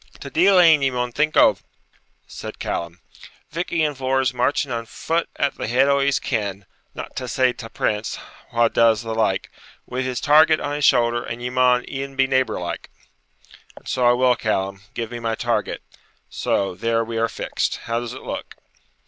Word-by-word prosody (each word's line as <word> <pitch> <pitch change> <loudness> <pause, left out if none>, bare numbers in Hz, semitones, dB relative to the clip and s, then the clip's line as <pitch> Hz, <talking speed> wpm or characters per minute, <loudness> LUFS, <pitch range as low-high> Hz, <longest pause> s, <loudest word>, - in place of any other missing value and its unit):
'Ta 140 - -8
deil 185 +6 +4
ane 160 -4 +6
ye 135 - +3
maun 125 -1 -2
think 150 +4 0
o',' - - +6 0.7
said - - -8
Callum. 85 +1 -4 0.5
'Vich 170 +3 -4
Ian 155 -3 +1
Vohr's 130 -1 0
marching 130 +2 0
on 115 -1 -3
foot 165 +7 -2
at 140 - 0
the - - -3
head 130 +4 +3
o' 140 0 +3
his 140 0 +2
kin 100 -2 -3 0.3
(not - - -8
to 130 - -4
say 125 +1 +2
ta 115 - -9
Prince, 105 -1 -2 0.3
wha 115 0 +3
does 115 0 +3
the 115 -1 -4
like), 110 -4 0 0.3
wi' 125 +1 -3
his 130 -1 -2
target 155 +2 +5
on 145 - -3
his 145 -1 0
shoulder; 120 0 +3
and 115 - -6
ye 125 - -3
maun 125 -1 +3
e'en 135 0 -5
be 135 0 +3
neighbour 130 -4 +1
like.' 90 - -5 0.9
'And - - -15
so 130 - -1
I 120 0 +6
will, 125 0 +3
Callum, 100 -4 -2
give 115 -1 -4
me 120 - -5
my 115 -1 -2
target; - - -2 0.5
so, 100 -2 -1
there 115 +4 0
we 115 0 -4
are 115 0 +1
fixed. - - -2
How 115 0 -1
does 120 +1 -6
it - - -10
look?' - - -6
125 Hz, 190 wpm, -22 LUFS, 115-135 Hz, 0.9 s, ane